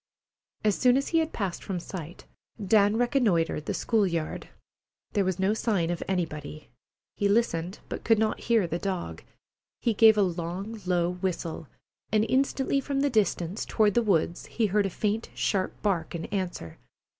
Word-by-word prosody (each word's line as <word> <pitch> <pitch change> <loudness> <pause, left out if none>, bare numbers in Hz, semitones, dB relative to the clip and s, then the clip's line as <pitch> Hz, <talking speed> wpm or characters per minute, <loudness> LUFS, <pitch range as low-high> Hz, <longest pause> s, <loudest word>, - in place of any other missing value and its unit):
As 210 -2 +3
soon 250 0 +4
as 275 - -1
he 330 - +3
had 320 0 -1
passed 195 -5 -3
from 185 -3 -3
sight, 170 -2 -8 0.3
Dan 205 +1 +3
reconnoitred 215 - +1
the - - 0
school 220 -4 +2
yard. 165 -3 -3 0.6
There 205 - +2
was 185 -2 -1
no 190 +2 +2
sign 200 -7 0
of 175 - -3
anybody. 155 -5 -4 0.5
He 205 - +1
listened, 190 -4 +1
but - - -6
could 225 -1 +4
not 215 0 0
hear 230 -5 +2
the 170 0 -3
dog. 190 -2 -4 0.6
He 235 - +1
gave 220 0 +6
a 205 - +5
long, 185 +5 -4
low 175 -2 +2
whistle, 180 -3 -4 0.4
and 215 0 +3
instantly 270 +2 +1
from 275 0 -1
the 285 0 +1
distance, 200 -4 0
toward 210 -2 +2
the 240 - +3
woods, 175 -5 0
he 230 - 0
heard 205 0 +2
a - - -4
faint, 210 +4 -2
sharp 190 -2 -1
bark 175 -6 0
in 165 - -4
answer. 180 - -4
200 Hz, 170 wpm, -27 LUFS, 175-220 Hz, 0.6 s, gave